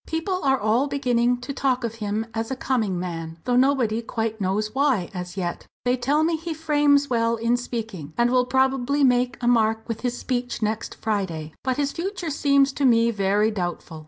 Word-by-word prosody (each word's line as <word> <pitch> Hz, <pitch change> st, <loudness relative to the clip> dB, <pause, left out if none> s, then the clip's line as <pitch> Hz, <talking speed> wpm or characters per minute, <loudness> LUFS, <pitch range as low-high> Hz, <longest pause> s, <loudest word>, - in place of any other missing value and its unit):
"People 365 Hz, +3 st, -2 dB
are 270 Hz, -1 st, +3 dB
all 225 Hz, +6 st, +2 dB
beginning 245 Hz, -3 st, +1 dB
to 280 Hz, +3 st, -5 dB
talk 260 Hz, -2 st, 0 dB
of 230 Hz, -1 st, -2 dB
him 210 Hz, +2 st, -1 dB
as 225 Hz, +1 st, -3 dB
a 265 Hz, -, -2 dB
coming 220 Hz, -9 st, -1 dB
man, 165 Hz, -2 st, -5 dB
though 245 Hz, 0 st, +1 dB
nobody 250 Hz, -4 st, +2 dB
quite 225 Hz, -1 st, -3 dB
knows 210 Hz, +3 st, -1 dB
why, 265 Hz, -9 st, +1 dB
as 180 Hz, +1 st, -6 dB
yet. 175 Hz, -2 st, -4 dB, 0.2 s
They 245 Hz, +1 st, +3 dB
tell 285 Hz, +5 st, +1 dB
me 325 Hz, 0 st, +1 dB
he 325 Hz, 0 st, -5 dB
frames 290 Hz, -2 st, +3 dB
well 230 Hz, -2 st, +1 dB
in 230 Hz, +1 st, +1 dB
speaking, 225 Hz, -10 st, -5 dB
and 240 Hz, 0 st, +3 dB
will 250 Hz, -1 st, +3 dB
probably 265 Hz, +2 st, +1 dB
make 245 Hz, -1 st, +3 dB
a 240 Hz, -, -1 dB
mark 225 Hz, -2 st, +2 dB
with 230 Hz, -2 st, -4 dB
his 245 Hz, -1 st, -2 dB
speech 245 Hz, -1 st, -3 dB
next 215 Hz, +1 st, -2 dB
Friday. 170 Hz, -8 st, -3 dB
But 260 Hz, -1 st, -1 dB
his 285 Hz, -1 st, 0 dB
future 360 Hz, -2 st, -4 dB
seems 280 Hz, -1 st, +3 dB
to 285 Hz, -, -3 dB
me 230 Hz, -2 st, +4 dB
very 205 Hz, +1 st, +1 dB
doubtful. 175 Hz, -4 st, -4 dB
240 Hz, 195 wpm, -24 LUFS, 215-270 Hz, 0.2 s, me